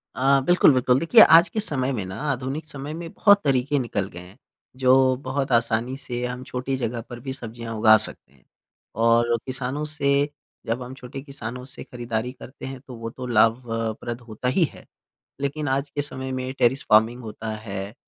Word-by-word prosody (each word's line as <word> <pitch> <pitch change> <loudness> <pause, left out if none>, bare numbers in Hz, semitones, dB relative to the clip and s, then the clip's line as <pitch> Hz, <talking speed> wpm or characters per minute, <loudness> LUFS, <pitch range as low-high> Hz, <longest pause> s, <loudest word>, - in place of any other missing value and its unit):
अ, 135 +3 +4
बिल्कुल, 175 -1 +6
बिल्कुल। 125 0 +3
देखिए 165 - +6
आज 165 -3 +8
के 220 - -3
समय 140 -10 0
में 105 -6 -3
ना 95 0 -7
आधुनिक 135 +4 -4
समय 145 +1 -6
में 165 0 -7
बहुत 205 -2 +5
तरीके 140 +1 +1
निकल 105 -6 -2
गए 85 - -10
हैं, 90 +4 -14 0.4
जो 130 0 +4
बहुत 135 +1 -2
आसानी 115 +1 +1
से 125 -2 -4
हम 125 +1 -5
छोटी 130 +1 -3
जगह 120 -2 -3
पर 120 - -8
भी 130 +2 -5
सब्ज़ियाँ 115 -2 -7
उगा 110 0 +7
सकते 65 - -10
हैं। 65 - -27 0.5
और 115 +1 +3
किसानों 130 +2 -2
से 145 -1 +1 0.4
जब 115 +3 -2
हम 125 +1 -8
छोटे 135 +1 -9
किसानों 125 -3 -7
से 130 +1 -10
ख़रीदारी 120 -1 -4
करते 130 +1 -11
हैं 135 0 -7
तो 125 - -8
वो 115 0 -6
तो 125 +2 -8
लाभ 115 +1 +2
अ, 115 0 -1
प्रद 120 +1 -5
होता 115 +1 -6
ही 130 +8 +3
है। - - -14 0.6
लेकिन 145 +2 -2
आज 135 +2 -1
के 145 - -2
समय 130 -2 -5
में 130 0 -3
टेरेस 130 +3 +3
फ़ार्मिंग 110 +3 +4
होता 110 0 -6
है 100 -2 -6
125 Hz, 195 wpm, -24 LUFS, 115-135 Hz, 0.6 s, आज